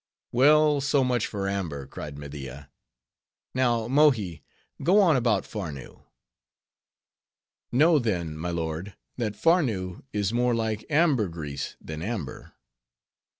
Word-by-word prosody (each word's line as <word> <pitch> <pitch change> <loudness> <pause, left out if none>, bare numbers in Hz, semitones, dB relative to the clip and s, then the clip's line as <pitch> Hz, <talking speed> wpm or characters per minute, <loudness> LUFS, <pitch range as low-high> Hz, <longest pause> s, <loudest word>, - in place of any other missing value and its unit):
"Well, 150 +3 +5
so 135 0 +2
much 125 -3 +1
for 100 -2 -3
amber," 85 -9 -3
cried 70 +1 -8
Media. 70 -1 -8 0.8
"Now, 120 -3 +1
Mohi, 120 - +3 0.4
go 180 +9 +4
on 175 -7 +5
about 115 -6 +1
Farnoo." 80 -11 -7 1.7
"Know, 155 +5 +5
then, 90 - -2
my 80 +3 -4
lord, 85 +3 -4 0.2
that 110 -4 -2
Farnoo 115 - +1
is 105 0 -1
more 120 0 +2
like 110 -2 -2
ambergris 100 - 0
than 80 0 -7
amber." 95 - -5
105 Hz, 110 wpm, -26 LUFS, 80-130 Hz, 1.7 s, Well